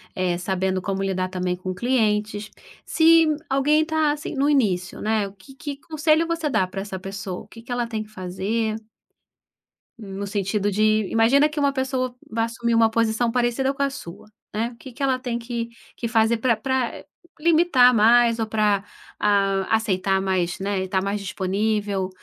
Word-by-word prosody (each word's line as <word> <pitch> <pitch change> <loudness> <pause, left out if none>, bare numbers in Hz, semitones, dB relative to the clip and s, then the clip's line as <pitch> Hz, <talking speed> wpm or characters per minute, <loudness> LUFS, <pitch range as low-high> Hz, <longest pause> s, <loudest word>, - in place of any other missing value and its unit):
Eh, 180 -2 0
sabendo 190 +1 -1
como 195 0 -2
lidar, 185 -1 -1
também, 180 -1 -2
com 185 +1 -5
clientes. 210 -2 0 0.3
Se 330 0 +5 0.2
alguém 290 +3 +3
tá, 315 -1 +1
assim, 295 0 -5
no 275 +1 +2
início, 195 -10 +1
né, 215 -1 0
o 195 - -12
que 200 +8 -17
que 290 -1 -6
conselho 310 +1 +1
você 335 -2 -1
dá 190 -9 +1
pra 195 +1 -5
essa 195 -1 -6
pessoa? 195 -1 -6
O - - -15
que, 230 - -13
que 245 - -10
ela 245 -1 -1
tem 220 -2 -3
que 210 - -17
fazer? 215 +3 -2 1.2
No 200 -2 -6
sentido 205 0 -1
de, 215 0 +2
imagina 255 +7 +4
que 300 0 -4
uma 280 -1 +2
pessoa 260 -2 -2
vai 225 +1 0
assumir 235 0 -2
uma 225 -1 +5
posição 230 +1 +1
parecida 250 +2 +1
com 280 0 -1
a 280 - +1
sua, 170 -11 -10 0.3
né, 225 +3 -1
o - - -16
que 260 +1 -11
que 275 - -5
ela 260 -2 +1
tem 245 -2 -3
que 235 -1 -4 0.3
que 235 - -3
fazer 225 0 +2
para 235 0 +2
para 255 +2 -2 0.4
limitar 310 -6 +5
mais, 230 +1 +5
ou 225 - -1
para, 210 -2 +1 0.4
ah, 195 -1 +2
aceitar 195 -3 +1
mais, 185 -2 -1
né, 195 -1 -1
e 190 - -5
tá 190 0 +1
mais 200 +2 -2
disponível, 200 0 -1
220 Hz, 185 wpm, -23 LUFS, 195-255 Hz, 1.2 s, Se